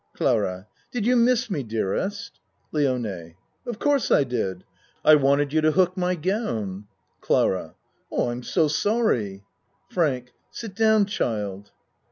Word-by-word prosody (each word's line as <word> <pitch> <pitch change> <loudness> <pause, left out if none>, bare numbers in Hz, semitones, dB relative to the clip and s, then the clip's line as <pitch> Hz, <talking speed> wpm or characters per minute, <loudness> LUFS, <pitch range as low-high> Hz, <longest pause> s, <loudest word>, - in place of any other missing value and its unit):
CLARA 90 +1 0 0.3
Did 235 -4 -2
you 250 +1 +4
miss 240 -1 +3
me, 150 - -1
dearest? 125 - -3 0.3
LIONE 115 - -2 0.3
Of 240 -3 -4
course 285 0 +1
I - - +5
did. 110 -8 -3 0.4
I 155 - +8
wanted 140 0 +3
you 155 - +3
to 155 0 +3
hook 185 +1 +3
my 180 -1 0
gown. 115 - -3 0.3
CLARA 90 -4 0 0.4
I 120 - 0
am 120 +1 -5
so 160 +5 +1
sorry. 145 - 0 0.5
FRANK 130 -8 0 0.2
Sit 225 -4 -8
down, 220 0 +4
child. 105 - -3
145 Hz, 135 wpm, -24 LUFS, -, 0.5 s, I